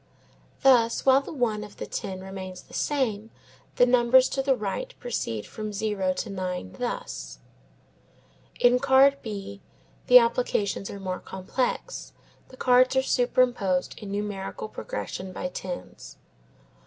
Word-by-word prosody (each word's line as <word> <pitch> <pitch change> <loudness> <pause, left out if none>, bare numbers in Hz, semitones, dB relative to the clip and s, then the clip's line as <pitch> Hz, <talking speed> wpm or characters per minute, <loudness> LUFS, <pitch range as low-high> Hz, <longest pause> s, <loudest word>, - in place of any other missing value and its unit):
Thus 240 -4 +4
while 265 0 +6
the - - -9
one 230 -7 -1
of 210 -1 -12
the - - -5
ten 185 -1 -5
remains 190 -1 -8
the - - -19
same 225 -7 -1 0.5
the 245 - +6
numbers 250 +1 +5
to 270 - -1
the 270 0 +2
right 255 - -4
proceed 115 - -3
from 215 -1 -6
zero 205 -2 -1
to 210 - -4
nine, 180 - -4
thus: - - -4 1.2
In 245 +1 +5
card 275 +1 +5
B 200 -2 -7 0.5
the 250 - +10
applications 230 -4 +1
are 200 - -7
more 185 -1 -4
complex. 250 - -3 0.3
The 255 - -15
cards 255 +1 +4
are 265 - +3
superimposed 245 -8 +1
in 210 - -8
numerical 205 - -4
progression 190 - -5
by 180 - -4
tens. 180 0 -8
220 Hz, 135 wpm, -26 LUFS, 195-255 Hz, 1.2 s, the